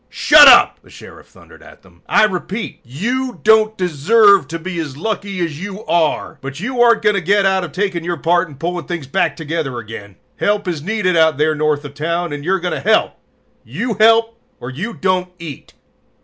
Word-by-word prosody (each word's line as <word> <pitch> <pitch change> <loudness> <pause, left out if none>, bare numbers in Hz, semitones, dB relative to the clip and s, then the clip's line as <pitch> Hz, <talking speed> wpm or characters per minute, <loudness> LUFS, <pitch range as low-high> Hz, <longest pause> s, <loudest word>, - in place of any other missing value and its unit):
"Shut 295 -1 +6
up!" 250 -3 +6
the - - -22
Sheriff - - -14
thundered - - -19
at - - -17
them. - - -23
"I - - +4
repeat: 210 +2 -3
you 240 - -4
don't 220 0 +3
deserve 195 +5 +3
to 165 - -5
be 175 +1 -6
as 145 -4 -6
lucky 200 +1 -4
as 165 -2 -4
you 205 +2 -8
are! 165 -3 -1
But 140 +2 -7
you 245 +5 -2
aren't 235 -2 +4
going 210 0 +3
to - - -1
get 200 +3 +1
out 190 -1 +1
of 170 - -7
taking 185 0 -3
your 175 0 -3
part 175 +3 +1
in 150 - -13
pulling 175 +4 -5
things 175 -5 -5
back 135 - -1
together 155 -5 -4
again. 110 -3 -9 0.2
Help 205 -1 -1
is 165 -5 -3
needed 190 0 -1
out 160 -3 +3
there 155 +1 +1
north 150 -1 -1
of 140 - -9
town, 170 +2 -3
and 145 0 -6
you're 190 +4 0
going 180 0 -3
to - - -3
help. - - +1 0.5
"You 195 - -4
help 225 +2 +3 0.2
or 125 - -7
you 190 - -5
don't 185 -1 -1
eat!" 160 -6 -10
180 Hz, 205 wpm, -17 LUFS, 155-210 Hz, 0.5 s, Shut